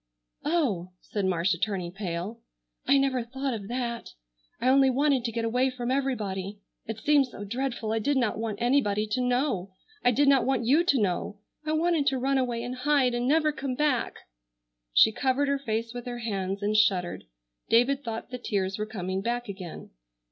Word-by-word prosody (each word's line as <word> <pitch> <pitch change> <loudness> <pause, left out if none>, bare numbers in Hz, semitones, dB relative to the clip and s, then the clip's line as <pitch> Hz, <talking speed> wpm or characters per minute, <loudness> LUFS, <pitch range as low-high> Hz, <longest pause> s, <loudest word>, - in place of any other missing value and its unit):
"Oh!" 230 - 0
said 205 -2 -3
Marcia, 175 0 +1
turning 190 -4 -2
pale, 190 +3 -4 0.5
"I 280 - +6
never 270 -2 +1
thought 265 +3 -3
of 205 -3 -5
that. 240 - -4 0.5
I 250 - 0
only 270 +1 +5
wanted 270 -1 +2
to 235 - -2
get 230 0 -2
away 250 +3 +2
from 250 -1 -3
everybody. 210 -8 -2 0.3
It 225 -1 -4
seemed 285 +3 +3
so 220 -4 -9
dreadful 235 0 -3
I 225 - +1
did 285 +6 +1
not 240 -4 0
want 220 -2 -3
anybody 235 -4 +2
to 215 +4 -1
know. 245 -7 0 0.3
I - - +5
did 275 +4 +3
not 275 -2 +5
want 255 -3 0
you 290 +8 +4
to 280 -7 +3
know. 200 0 -1 0.3
I 310 - +1
wanted 320 -2 +2
to 265 - +2
run 270 +1 +1
away 240 -2 -1
and 250 +1 -5
hide, 270 -2 +2
and 240 +1 -1
never 305 +2 +3
come 265 -2 -4
back!" 290 -4 +1 0.8
She 220 - +6
covered 265 +4 +1
her 280 0 +1
face 230 -2 -2
with 245 0 -7
her 240 0 -4
hands 200 -4 -3
and 210 +1 +1
shuddered. 190 -5 +2 0.4
David 265 +5 +3
thought 230 +1 -5
the 250 - -5
tears 195 -4 -2
were 215 - -2
coming 190 -3 -3
back 240 +3 -2
again. 190 -4 -8
240 Hz, 190 wpm, -27 LUFS, 205-270 Hz, 0.8 s, I